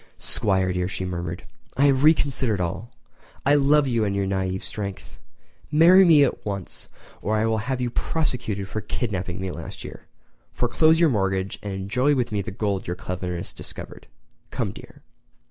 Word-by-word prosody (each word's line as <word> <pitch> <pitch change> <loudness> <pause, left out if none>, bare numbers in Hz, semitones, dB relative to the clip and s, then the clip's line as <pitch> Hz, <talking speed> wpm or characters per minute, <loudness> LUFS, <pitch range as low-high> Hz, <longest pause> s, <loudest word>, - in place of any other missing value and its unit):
"'Squire, 95 -3 +2
dear," 90 0 -1
she 95 0 -4
murmured, 85 -1 -4 0.3
"I 140 - +4
have 135 -1 +3
reconsidered 140 - +3
all. 95 +6 -3 0.6
I 140 - +5
love 145 0 +4
you 115 -3 +1
and 100 -1 -1
your 100 -1 0
naive 95 -1 -2
strength. 100 -2 -6 0.5
Marry 170 +5 +7
me 160 -5 +7
at 135 - -1
once 100 -3 -4 0.3
or 110 - 0
I 110 - +1
will 110 -1 +1
have 125 +4 -2
you 125 -1 -1
prosecuted 120 -11 -1
for 110 - -4
that - - -25
kidnapping 95 -6 -3
last - - -8
year. - - -10 0.5
Foreclose 155 +7 +3
your 170 -2 +5
mortgage 95 -2 -1
and 100 -1 -5
enjoy 120 +10 +1
with 125 -3 -1
me 105 -1 0
the - - -6
gold 100 -1 -2
your 90 - -2
cleverness 90 -2 -5
discovered. - - -9 0.4
Come, - - -2
dear!" - - -14
105 Hz, 170 wpm, -24 LUFS, 95-135 Hz, 0.6 s, Marry